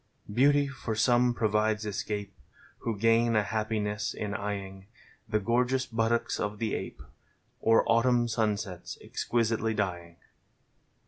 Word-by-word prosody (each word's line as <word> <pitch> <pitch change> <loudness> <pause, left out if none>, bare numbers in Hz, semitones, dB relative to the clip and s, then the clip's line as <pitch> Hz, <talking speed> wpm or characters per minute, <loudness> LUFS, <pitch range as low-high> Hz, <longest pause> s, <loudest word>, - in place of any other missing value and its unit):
Hoautv 140 +4 +4
for 120 -4 -4
some 120 +2 +3
provides 110 -1 +1
escape. 105 -1 -4 0.5
Who 115 -3 -3
gain 115 +2 +3
a 105 - +4
luippiness 105 0 -2
in 105 -1 -4
e) - - -3
eing 100 -2 -5 0.4
The 105 -1 +2
gorgeous 125 +4 +1
buttocks 115 0 0
of 105 0 -2
the 110 -1 -2
ape - - -5 0.6
Or 115 0 +4
Autumn 120 +1 +3
sunsets 105 -5 -2
exquisitely 115 -1 -1
dnng. 85 -4 -3
110 Hz, 125 wpm, -29 LUFS, 105-115 Hz, 0.6 s, Hoautv